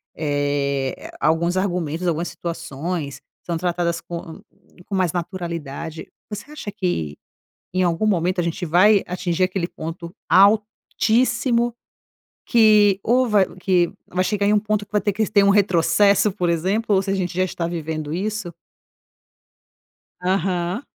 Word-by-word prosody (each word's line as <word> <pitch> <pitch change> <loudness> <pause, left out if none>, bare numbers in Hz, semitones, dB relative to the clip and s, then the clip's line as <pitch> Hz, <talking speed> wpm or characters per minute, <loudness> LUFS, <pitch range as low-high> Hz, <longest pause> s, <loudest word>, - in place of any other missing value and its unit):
eh, 145 -2 -1
a - - +1
alguns 170 +3 +1
argumentos, 175 -3 -1
algumas 170 +1 0
situações 165 -3 -5 0.2
são 170 - -3
tratadas 170 0 -1
com 170 -1 -8 0.5
com 200 - -3
mais 185 -3 +1
naturalidade. 165 -3 -5 0.2
Você 210 +6 -7
acha 255 -9 -6
que 80 - -2 0.6
em 185 - +2
algum 175 +4 +1
momento 180 -2 +1
a - - -1
gente 170 +1 -3
vai 185 +5 +5
atingir 180 0 -2
aquele 185 -2 -2
ponto 170 +2 -7
altíssimo 230 +4 +2 0.7
que 210 -4 +5
ou 250 +2 +3
vai 205 -3 +4
que 180 -2 +1 0.2
vai 185 - -1
chegar 205 +1 0
em 205 - +3
um 210 - +4
ponto 210 0 -1
que - - -43
vai 210 - +2
ter 205 - 0
que 220 +3 0
ter 200 - +5
um 200 - +5
retrocesso 200 +1 +4
por 180 -3 -1
exemplo 195 +7 0
ou 190 - +3
se 195 - -5
a - - +1
gente 180 -2 -2
já 185 - +3
está 175 -2 -4
vivendo 155 -2 -4
isso? 200 -1 -3 1.7
Aham. 185 - -1
180 Hz, 150 wpm, -22 LUFS, 170-205 Hz, 1.7 s, vai